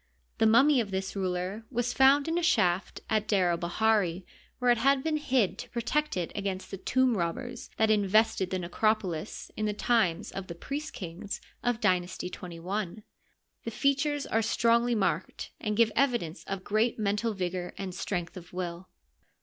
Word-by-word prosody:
The 220 - +5
mummy 255 +4 +5
of 210 - -4
this 190 0 -3
ruler 185 +2 -2
was 245 -1 -1
found 275 +2 +5
in 330 +1 +1
a - - -2
shaft 185 - +1
at 215 -1 0
D^r 185 -4 +3
el 170 - -1
bahiri, 185 0 +1 0.3
where 250 -1 +3
it 240 - +3
had 270 +2 +3
been 315 -1 +1
hid 260 -9 +1
to - - -7
pro 240 - -3
tect 300 +1 0
it 175 -2 -2
against 195 -2 -4
the 195 - -4
tomb 255 +4 +2
robbers 205 +7 -3
that 220 0 +3
invested 210 -1 +3
the 185 - -1
necrop 215 +5 +1
olis 175 +1 -5
in 215 - -1
the 210 - -1
times 210 -8 +1
of 195 -1 -6
the 170 - -7
priest 290 - -5
kings 185 +3 -6 0.2
of 245 -2 0
Dynasty 180 -3 0
XXI. 180 +4 -5 0.6
The - - -3
features 280 +4 +1
are 225 - +1
strongly 235 +2 +2
marked, 195 -3 -1
and 210 -1 -2
give 230 -1 +4
evidence 240 - 0
of 195 -1 -4
great 215 +4 +1
mental 210 +1 0
vigor 180 -1 -3
and 190 -2 -5
strength 175 -2 -3
of 180 -2 -10
will. 180 0 -5
210 Hz, 180 wpm, -29 LUFS, 185-240 Hz, 0.6 s, The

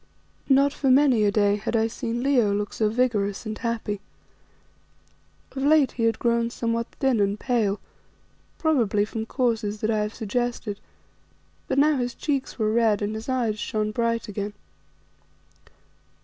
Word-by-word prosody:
Not 275 +1 +4
for 275 - 0
many 260 -4 +5
a 205 - +3
day 205 -1 +2
had 215 +3 -3
I 220 0 +3
seen 230 +1 -3
Leo 250 -7 +3
look 205 0 -3
so 215 -1 +1
vigorous 215 -4 0
and 215 0 -4
happy. 225 -4 -3 1.5
Of 270 - -5
late 290 -1 +4
he 230 - -1
had 225 - +2
grown 235 -1 +1
somewhat 230 -1 -2
thin 265 -5 +2
and 200 +1 +1
pale, 220 -5 0 0.8
probably 235 -10 +2
from 220 +1 -5
causes 225 -5 -1
that 220 - +1
I 215 - +1
have 210 +1 -2
suggested, 225 -1 -3 0.9
but - - -1
now 295 +1 +4
his 245 -1 -2
cheeks 280 -3 -2
were 215 -2 +1
red 220 -3 +2
and 205 +1 -2
his 220 +3 -6
eyes 235 -5 0
shone 215 0 -2
bright 230 +1 -1
again. 205 0 -4
230 Hz, 155 wpm, -25 LUFS, 210-250 Hz, 1.5 s, many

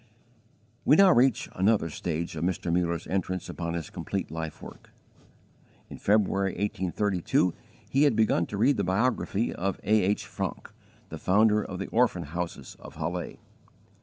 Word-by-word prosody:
We 145 - +5
now 195 +1 +7
reach 125 -3 +3
another 95 -4 +2
stage 85 +1 -3
of 80 - -3
Mr. 90 -1 -1
Muller's 85 -1 0
entrance 95 -1 -2
upon 85 -1 -4
his 85 -3 -5
complete - - -4
life 80 -1 -5
work. - - -12 1.0
In - - -8
February, 100 -2 +2
1832, 95 -2 0 0.3
he 135 - +1
had 140 -6 +3
begun 110 -6 +2
to 100 - -5
read 125 +6 +3
the 100 - 0
biography 105 +3 0
of 95 +1 -2
A. 110 +1 +3
H. 100 +3 0
Francke, - - -5 0.4
the - - -7
founder 105 +2 +3
of 95 - -6
the 100 - -4
Orphan 115 -7 +2
Houses 85 -3 -6
of - - -12
Halle. 85 +3 -4
95 Hz, 155 wpm, -27 LUFS, 85-105 Hz, 1.0 s, now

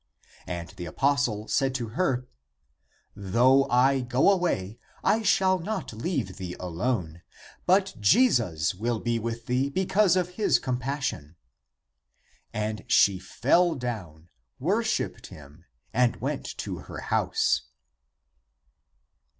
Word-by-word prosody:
And 85 -1 -5
the 90 -1 -8
apostle 130 - 0
said 135 -1 +1
to 120 -4 -3
her, 130 -1 0 0.5
" - - -41 0.2
Though 130 +3 +5
I 130 +2 +4
go 125 +9 +3
away, 120 - -1 0.2
I 225 - +3
shall 190 -3 +3
not 190 - -4
leave 115 - -3
thee 90 -2 -6
alone, 90 -2 -2 0.5
but 190 +1 +3
Jesus 105 - +3
will 115 +4 -2
be 120 0 -1
with 115 +1 -5
thee 130 +3 0
because 190 +3 +2
of 180 -1 0
his 205 - +4
compassion." 125 - -3 1.2
And 105 -1 -3
she 95 -2 +4
fell 160 - +2
down, 95 - -6 0.3
worshipped 215 - -1
him, 75 +3 -14 0.3
and 125 -1 +3
went - - -4
to - - -4
her - - -9
house. - - +1
125 Hz, 120 wpm, -27 LUFS, 100-160 Hz, 1.2 s, Though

